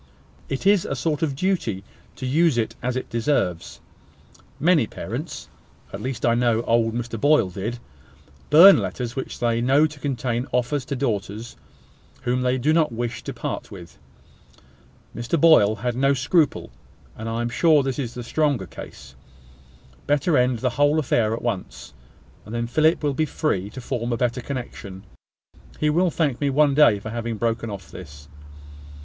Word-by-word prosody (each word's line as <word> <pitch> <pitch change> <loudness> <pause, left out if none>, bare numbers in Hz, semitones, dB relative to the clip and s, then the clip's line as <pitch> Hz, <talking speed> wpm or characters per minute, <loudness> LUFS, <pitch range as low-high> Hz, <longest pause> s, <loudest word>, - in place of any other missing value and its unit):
It 135 +6 -4
is 200 -2 +4
a 135 - -3
sort 150 +3 -2
of 150 -4 -1
duty 135 - -1 0.3
to 130 - -6
use 150 +1 +2
it 115 - -1
as 125 +1 -2
it 130 - -3
deserves. 115 - -1 0.8
Many 160 -7 +3
parents - - -6 0.5
(at - - -6
least 130 -1 -3
I 115 - +4
know 120 -1 +1
old 115 -1 +1
Mr 120 -2 -4
Boyle 145 -10 +3
did) 105 +6 -4 0.7
burn 180 +6 +9
letters 120 0 -4
which 130 - -5
they 115 -1 0
know 135 +5 +4
to 150 -2 -6
contain 125 -2 -2
offers 125 +3 -1
to 140 - -3
daughters 110 -3 -3 0.7
whom 125 0 0
they 125 +1 +1
do 145 +5 +1
not 160 -4 +2
wish 120 0 -4
to - - -4
part - - -5
with. - - -12 1.2
Mr 120 +8 -1
Boyle 140 -10 +6
had 120 +3 -3
no 135 +2 +2
scruple; 145 - +1 0.4
and 110 +1 -6
I 115 +1 -2
am 120 - -2
sure 150 +4 +3
this 135 -1 -3
is 125 -3 -4
a 120 - -5
stronger 140 -5 0
case. - - -11 0.9
Better 145 +3 +2
end 125 -1 +2
the 125 - +1
whole 145 +2 +4
affair 120 -7 +1
at - - -8
once; 115 -6 -5 0.5
and 110 - -8
then 120 0 -1
Philip 155 +7 +2
will 145 -1 +1
be 155 +3 0
free 100 -13 -1
to 120 - -9
form 120 -1 -3
a 120 - 0
better 125 +1 -1
connection. 120 -8 -7 0.8
He 150 0 +2
will 175 +4 +2
thank 150 -6 -1
me 140 - +1
one 145 +1 +3
day 135 -7 +5
for 110 +2 -7
having 115 -1 -4
broken 115 0 -1
off 100 -4 -8
this." 70 -5 -11
125 Hz, 170 wpm, -23 LUFS, 115-145 Hz, 1.2 s, burn